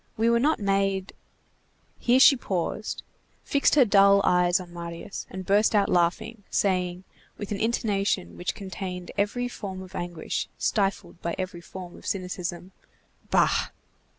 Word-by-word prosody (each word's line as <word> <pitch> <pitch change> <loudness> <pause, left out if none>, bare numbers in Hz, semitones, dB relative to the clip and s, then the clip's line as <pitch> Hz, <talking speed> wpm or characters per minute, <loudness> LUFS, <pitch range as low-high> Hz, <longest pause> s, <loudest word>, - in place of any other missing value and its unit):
We 230 +2 +3
were 235 - +4
not 300 +6 +2
made—" 195 -1 0 0.9
Here 245 +2 +4
she 275 - +8
paused, 200 -2 -3 0.4
fixed 280 +1 +2
her 275 -4 +6
dull 200 -1 +6
eyes 180 0 +3
on 175 -2 -10
Marius, 170 +3 -7
and 190 0 -7
burst 205 +3 +3
out 200 -1 +3
laughing, 180 +6 +1
saying, 180 -2 0 0.3
with 205 - -6
an 200 - -2
intonation 205 -4 0
which 175 - -3
contained 185 -3 -6
every 210 +5 0
form 190 -6 -6
of 185 0 -13
anguish, 175 -3 -4
stifled 195 -4 -1
by 170 - -2
every 185 -2 -4
form 180 0 -9
of - - -11
cynicism:— 180 -1 -4 0.6
"Bah!" - - +3
195 Hz, 145 wpm, -26 LUFS, 180-210 Hz, 0.9 s, she